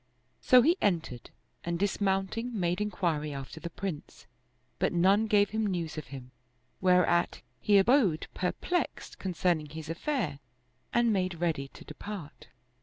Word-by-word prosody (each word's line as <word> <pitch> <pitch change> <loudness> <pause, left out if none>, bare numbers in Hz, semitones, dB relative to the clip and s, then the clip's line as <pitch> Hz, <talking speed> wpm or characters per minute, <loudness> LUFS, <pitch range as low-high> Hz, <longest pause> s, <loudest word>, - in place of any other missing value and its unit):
So 250 -1 +6
he 335 +7 +4
entered, 165 - -1 0.3
and 170 0 -2
dismounting, 200 +4 -1
made 175 +2 0
inquiry 160 -8 -1
after 135 +4 -7
the 170 - -6
Prince, 175 -3 -6 0.5
but - - +2
none 195 +5 +4
gave 205 -1 +3
him 220 0 0
news 175 -5 -2
of 155 -4 -6
him; 125 -1 -9 0.5
whereat 180 -1 +3 0.2
he 205 -1 +4
abode 195 - +4
perplexed 350 - -2
concerning 175 -4 0
his 160 +1 -6
affair 175 - -2 0.5
and 235 -2 +3
made 185 -2 0
ready 160 -5 -1
to - - -15
depart. 195 -8 -8
180 Hz, 135 wpm, -30 LUFS, 160-205 Hz, 0.5 s, So